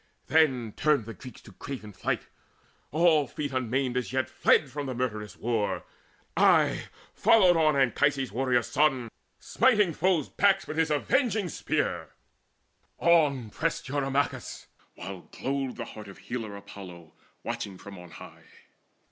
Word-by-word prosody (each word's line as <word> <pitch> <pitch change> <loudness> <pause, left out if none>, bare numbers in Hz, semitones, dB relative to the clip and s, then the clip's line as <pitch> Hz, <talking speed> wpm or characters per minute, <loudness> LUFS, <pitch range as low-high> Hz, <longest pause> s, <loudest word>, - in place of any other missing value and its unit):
Then 130 -9 +2
turned 150 -7 +2
the 115 - -7
Greeks 125 +6 -12
to 105 - -15
craven 110 0 -8
flight; - - -2 0.7
all 155 -2 +3
feet 145 +1 -4
Unmaimed 130 0 -1
as 125 -1 -2
yet 130 0 -1
fled 140 -4 +3
from 145 0 -4
the 130 - -4
murderous 110 -5 -3
war. 115 -3 -1 0.5
Aye - - +4 0.3
followed 205 -5 +5
on 155 -2 +3
Anchises' 135 0 +2
warrior 125 +1 +1
son, 135 -3 +1 0.3
Smiting 210 -9 +2
foes' 180 -4 +1
backs 195 -1 +2
with 155 - -6
his 165 -1 +2
avenging 215 - +1
spear: - - -2 0.8
On 145 -9 +3
pressed 165 -2 -2
Eurymachus, 135 -4 -2 0.3
while 95 0 -9
glowed 135 -1 -3
the 120 - -5
heart 105 -2 -10
Of 100 - -11
Healer 110 -4 -6
Apollo 90 -5 -11 0.3
watching 95 -2 -5
from 100 0 -11
on 90 0 -12
high. - - -13
130 Hz, 140 wpm, -28 LUFS, 115-155 Hz, 0.8 s, followed